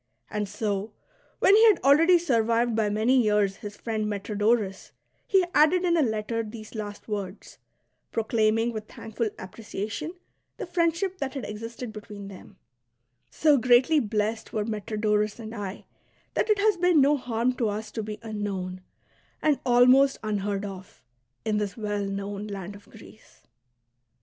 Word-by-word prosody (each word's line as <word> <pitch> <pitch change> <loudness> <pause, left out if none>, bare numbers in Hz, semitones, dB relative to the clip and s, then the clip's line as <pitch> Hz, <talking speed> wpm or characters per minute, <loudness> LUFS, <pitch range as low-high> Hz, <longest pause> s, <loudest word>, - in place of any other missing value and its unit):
And 210 -2 -2
so, 210 -1 -3 0.4
when 395 - +5
he 440 - +6
had 420 -5 +5
already 325 +6 +6
survived 235 -6 +1
by 220 -2 +1
many 225 +5 +3
years 210 -3 +2
his 205 0 -8
friend 220 -2 -2
Metrodorus, 205 0 -1 0.3
he 380 -2 +4
added 350 +4 +4
in 340 -1 +3
a 330 - +3
letter 225 -2 -1
these 215 -1 -9
last 205 -2 -7
words, 200 -2 -6 0.5
proclaiming 225 +1 +1
with 215 -1 -6
thankful 225 0 -4
appreciation 220 - -6 0.4
the - - -4
friendship 350 +2 0
that 275 0 -3
had 265 -6 -4
existed 230 +2 -7
between 210 -2 -9
them: 190 0 -13 0.4
" 120 - -50 0.3
So 300 -2 +3
greatly 250 +6 +5
blest 220 -1 -2
were 215 -1 -1
Metrodorus 210 -1 -1
and 225 -1 -8
I 200 -3 -6 0.5
that - - 0
it 425 - +4
has 415 -1 +3
been 355 -2 +4
no 285 +2 +5
harm 245 -2 -1
to 230 -3 +1
us 215 +2 -5
to 225 - -3
be 210 0 -6
unknown, 195 -4 -4 0.6
and 300 -3 +2
almost 255 +3 +5
unheard 205 -1 -2
of, 190 -7 -10 0.4
in 215 -1 +1
this 205 0 -3
well 205 -2 -2
known 200 +1 -4
land 200 -1 -6
of 205 - -16
Greece." - - -17
220 Hz, 155 wpm, -26 LUFS, 205-255 Hz, 0.6 s, he